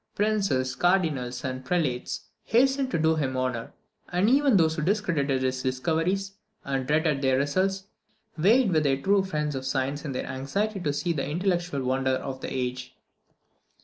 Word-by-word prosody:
Princes, 195 -12 +1
Cardinals, 155 -10 0
and 130 0 -4
Prelates 135 -5 -1 0.2
hastened 265 +3 +2
to - - 0
do 160 0 +2
him 130 -4 -1
honour; 125 -3 -2 0.4
and 185 +6 +2
even 275 -4 +4
those 160 -2 +3
who 155 - -2
discredited 155 -8 0
his 130 0 -1
discoveries, 170 +10 -1 0.3
and 135 -2 -2
dreaded 150 -1 +1
their 130 -1 +2
results, 185 +8 0 0.5
vied 205 +7 +4
with 155 -2 +3
the 135 -2 +1
true 195 +5 +3
friends 150 -5 -2
of 135 -1 -4
science 135 +2 -2
in 150 - -4
their 130 - -3
anxiety 195 +11 -2
to 150 -5 -1
see 145 +4 -1
the 140 -3 -3
intellectual 175 -3 -1
wonder 130 +1 +1
of 130 0 -5
the - - -5
age. 125 0 -4
150 Hz, 165 wpm, -26 LUFS, 130-190 Hz, 0.5 s, even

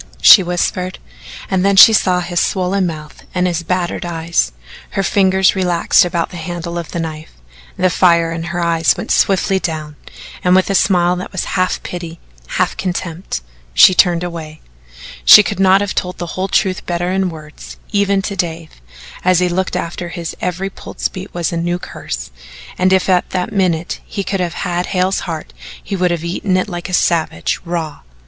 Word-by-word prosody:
she 200 - +9
whispered, 180 +1 -2 0.5
and 190 -1 0
then 200 0 +3
she 220 +3 +9
saw 185 -3 +2
his 175 -1 -2
swollen 185 0 0
mouth 155 -2 -8
and 180 0 +1
his 175 -2 -1
battered 175 +1 -2
eye. 170 -1 -6 0.6
Her 195 - -2
fingers 190 0 +3
relaxed 180 0 +3
about 170 -2 -2
the 180 - -8
handle 170 +1 -5
of 170 - -7
the 170 - -4
knife, 160 -1 -6 0.4
the 185 0 +2
fire 170 -2 +3
in 165 0 -4
her 175 +1 -4
eyes 165 -1 +2
went - - -5
swiftly 195 0 +2
down, 155 -4 -4 0.5
and 180 0 +4
with 190 +1 +2
a - - +1
smile 180 -2 +3
that 180 - -6
was 185 - -3
half 185 -1 0
pity, 170 -2 -7 0.4
half - - +1
contempt, 175 - -4 0.3
she 185 - +8
turned 175 -2 +3
away. 160 -3 -7 0.6
She - - +9
could - - -4
not 190 0 +5
have 205 -1 -2
told 180 0 -3
the 175 -1 -6
whole 185 +1 -2
truth 190 -1 0
better 175 +1 -1
in 190 -1 0
words, 155 -2 -11
even 200 -1 +1
to 200 - -4
Dave, 165 - -5 0.4
and 185 - +2
as 180 - +3
he 180 0 +1
looked 185 +1 -1
after 170 +1 -4
her 170 - -8
his 170 -3 -5
every 185 +2 -3
pulse - - -5
beat 190 +2 -9
was 175 0 -2
a - - -2
new 175 +1 -1
curse, - - -7 0.4
and 185 +1 +2
if 190 -1 +2
at 180 -2 +2
that 180 -1 -3
minute 180 -4 0
he 200 - -4
could 195 +1 -2
have 175 -1 -2
had 175 0 -2
Hale's 185 0 0
heart 160 - -6 0.3
he - - -4
would 180 -1 +1
have 170 -2 -2
eaten 185 +2 -1
it 185 - -1
like 175 -1 -6
a - - -7
savage 160 - 0
raw. 165 -3 -4
180 Hz, 195 wpm, -16 LUFS, 170-185 Hz, 0.6 s, she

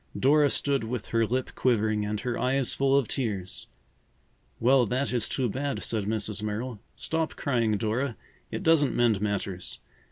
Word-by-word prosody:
Dora 145 +4 +5
stood 140 -2 +1
with 115 0 -4
her 115 -1 +2
lip 130 +3 -1
quivering 110 -4 +1
and 105 0 -2
her 125 -2 -2
eyes 130 0 +2
full 135 0 +3
of 135 -5 +1
tears. 100 -9 -3 0.9
"Well, 125 0 +4
that 130 +4 0
is 120 -3 +1
too 130 -2 0
bad," 135 +5 -3
said 110 -3 -1
Mrs. 105 -1 -2
Merrill. 110 +2 -3 0.2
"Stop 160 0 -2
crying, 115 -6 +1
Dora; 115 +2 -1 0.3
it - - -4
doesn't 160 -4 +4
mend 115 -4 +3
matters. 100 -3 -3
120 Hz, 160 wpm, -27 LUFS, 105-135 Hz, 0.9 s, Dora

